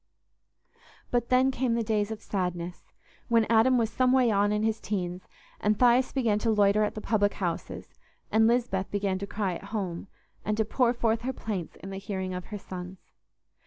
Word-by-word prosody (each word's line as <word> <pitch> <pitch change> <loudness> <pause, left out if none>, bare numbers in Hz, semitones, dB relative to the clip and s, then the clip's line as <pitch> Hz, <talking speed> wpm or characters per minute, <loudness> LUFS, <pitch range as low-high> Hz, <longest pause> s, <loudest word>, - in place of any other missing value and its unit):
But 240 -1 0
then 255 +1 +4
came 255 -2 0
the 235 - 0
days 210 -1 0
of 220 -1 -6
sadness, 180 -2 -4 0.4
when 230 -2 +3
Adam 235 +3 +5
was 225 -2 +1
someway 255 0 +3
on 205 0 +2
in 210 0 0
his 220 0 0
teens, 180 -3 -4 0.3
and 210 0 +1
Thias 250 +1 +4
began 230 -6 +1
to 230 - 0
loiter 210 -1 +4
at 210 - -1
the 215 - -5
public 205 -2 +1
houses, 175 -4 -4 0.4
and 220 +1 +5
Lisbeth 230 -5 +1
began 200 -2 -1
to 200 - -5
cry 200 -2 -2
at - - -13
home, 200 -4 -4 0.4
and 210 +1 -1
to 220 - +2
pour 240 +2 +2
forth 230 -1 +1
her 260 +2 -2
plaints 200 -9 -5
in 195 - -6
the 195 - -5
hearing 190 -2 -4
of 180 0 -5
her 210 - -6
sons. 185 -1 -8
210 Hz, 190 wpm, -28 LUFS, 195-230 Hz, 0.4 s, Adam